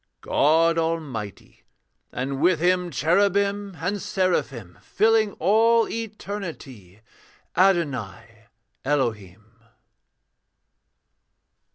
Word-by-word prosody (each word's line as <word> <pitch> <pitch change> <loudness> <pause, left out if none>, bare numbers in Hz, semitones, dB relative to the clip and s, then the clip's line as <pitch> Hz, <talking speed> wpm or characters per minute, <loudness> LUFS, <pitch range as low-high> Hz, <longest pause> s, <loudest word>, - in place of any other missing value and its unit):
'God 165 +3 +2
Almighty, 150 - -5 0.5
and 135 +2 -4
with 175 -1 +3
Him 180 +1 +1
Cherubim 200 +4 +1
and 195 +4 -2
Seraphim, 135 - -2
Filling 220 -2 +2
all 225 +5 +3
eternity 180 - -7 0.5
Adonai 120 - -1 0.4
Elohim.' 115 -5 -3
165 Hz, 65 wpm, -24 LUFS, 120-200 Hz, 0.5 s, with